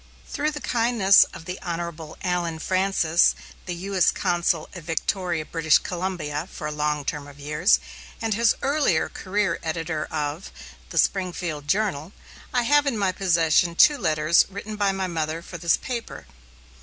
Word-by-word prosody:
Through 300 +1 -1
the 300 -1 -6
kindness 230 -5 +4
of 160 - -12
the 180 +2 -5
Hon. 170 -2 -5
Allen 175 -3 -1
Francis, 185 -1 +2 0.3
U.S. 185 +1 +1
Consul 175 -3 0
at 180 - -8
Victoria, 170 +1 -2
British 160 -1 +3
Columbia, 170 -3 -4
for 155 - -7
a 150 - -2
long 150 -1 -1
term 145 -1 -4
of 145 0 -14
years, 150 +7 +2 0.4
and 225 -1 -1
in - - -2
his 235 -2 +4
earlier 280 - +1
career 200 -2 -1
editor 160 -1 -3
of 150 +3 -4 0.4
The - - -7
Springfield 175 -6 0
Journal, 190 -4 -1 0.4
I 245 -1 +1
have 290 +3 +3
in 255 -5 0
my 195 -2 +1
possession 170 -2 +2
two 295 - +6
letters 155 +2 +3
written 205 +2 -7
by 205 -1 +1
my 195 -1 -2
mother 165 -2 -3
for 175 -1 -9
this 170 0 +2
paper. 240 -3 -6
175 Hz, 155 wpm, -24 LUFS, 160-195 Hz, 0.4 s, two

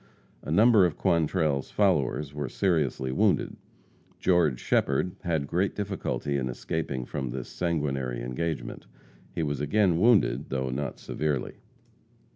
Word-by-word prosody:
A - - -9
number 105 +5 +6
of 80 - -7
Quantrell's 80 -5 +1
followers 75 -7 +1
were 75 -2 -4
seriously 75 -8 0
wounded. 65 - +1 0.6
George 85 -9 +2
Shepherd 90 - +1
had 80 -5 0
great 90 +7 0
difficulty 95 -8 -2
in 65 -2 -2
escaping 65 0 -3
from 65 -1 -4
this 65 0 -5
sanguinary 70 -8 -2
engagement. 80 +6 -4 0.5
He 80 - 0
was 75 -2 -2
again 90 +2 +2
wounded, 115 0 +3
though 65 -1 -2
not 70 +1 -3
severely. 75 -4 -3
75 Hz, 125 wpm, -27 LUFS, 65-90 Hz, 0.6 s, number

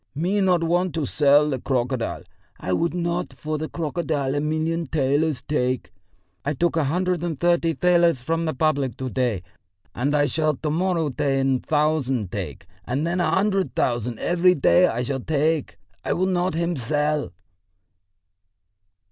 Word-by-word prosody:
"Me 185 +7 0
not 180 -3 +3
want 175 0 +1
to 160 -3 -1
sell 145 +1 +4
the 135 -3 -2
crocodile! 125 -1 -2 0.4
I 95 - -2
would 170 - 0
not 170 0 -2
for 155 0 -4
the 155 - -4
crocodile 150 -4 -2
a 145 - 0
million 160 +2 -1
thalers 145 0 0
take. 130 -4 -1 0.5
I 145 +2 -1
took 170 +5 +1
a 160 -3 +2
hundred 180 +3 0
and 165 -5 -3
thirty 170 -1 +2
thalers 170 -4 +3
from 165 +6 -1
the 155 - -1
public 140 -4 0
to 130 -1 -4
day, 120 -8 -1 0.5
and 140 +5 0
I 145 0 +3
shall 155 0 0
to 150 +3 -3
morrow 170 -1 0
ten 135 -1 +1
thousand 145 - 0
take, 90 -9 -5 0.2
and 135 +8 -2
then 170 +2 -1
a - - +1
hundred 195 -1 +1
thousand 120 -1 0
every 180 +5 +3
day 180 +5 +4
I 120 -4 -2
shall 135 +1 -2
take. 155 +2 0 0.3
I - - 0
will 185 - 0
not 180 -2 0
him 170 +1 0
sell." 150 - -1
155 Hz, 165 wpm, -23 LUFS, 135-170 Hz, 0.5 s, sell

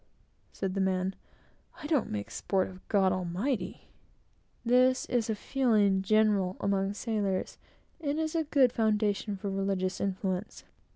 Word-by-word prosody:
said 190 -1 -3
the 195 - 0
man, 190 0 0 0.7
"I - - -6
don't 295 -5 +1
make 100 -1 -4
sport 190 -2 0
of 185 0 -14
God 195 -2 +3
Almighty." 185 +4 -2 0.8
This 255 +2 +4
is 235 -2 0
a 220 - +1
feeling 210 -6 +2
general 200 -2 +2
among 200 0 0
sailors, 205 -4 -2 0.4
and 295 -2 -2
is 315 -1 -1
a 325 -2 0
good 275 -4 +4
foundation 210 -2 0
for 195 +1 -4
religious 195 -1 -1
influence. 190 0 -3
200 Hz, 135 wpm, -30 LUFS, 190-235 Hz, 0.8 s, This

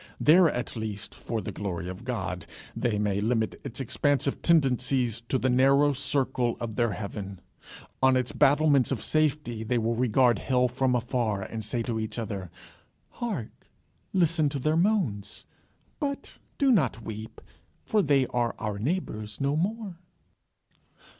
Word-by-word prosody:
There, 170 +2 +6
at 125 -3 -3
least, 110 -2 -4
for 115 -2 -4
the - - -5
glory 90 -4 -4
of 95 +4 -7
God, 90 -9 -4 0.3
they 115 -4 0
may 100 -1 0
limit 110 0 0
its 120 - -7
expansive 140 +2 0
tendencies 130 -6 +2
to 130 - +2
the 130 - 0
narrow 135 +3 +4
circle 130 -3 0
of 115 -2 -4
their 115 -2 +1
heaven. 100 -2 -6 0.6
On 130 -1 +5
its 125 -1 -1
battlements 145 -2 +4
of 130 - -2
safety, 150 -7 0
they 120 +2 0
will 115 0 +1
regard 120 -1 +3
hell 125 -1 +2
from 125 +1 0
afar, 115 -5 -1
and 110 +2 -6
say 115 +2 -2
to 115 -1 -2
each 110 +1 -4
other, 100 -5 -4 0.6
"Hark! 205 - -6 0.4
Listen 165 -4 +2
to 140 - -3
their 155 +4 +1
moans. 160 - 0 0.5
But 280 -2 -4 0.2
do 275 -2 +4
not 130 - +2
weep, 110 +1 -7 0.4
for 215 - +2
they 140 -6 +3
are 120 -1 0
our 105 -2 -3
neighbours 110 - -3
no 140 +1 +1
more." 195 +1 -2
125 Hz, 150 wpm, -27 LUFS, 110-145 Hz, 0.6 s, There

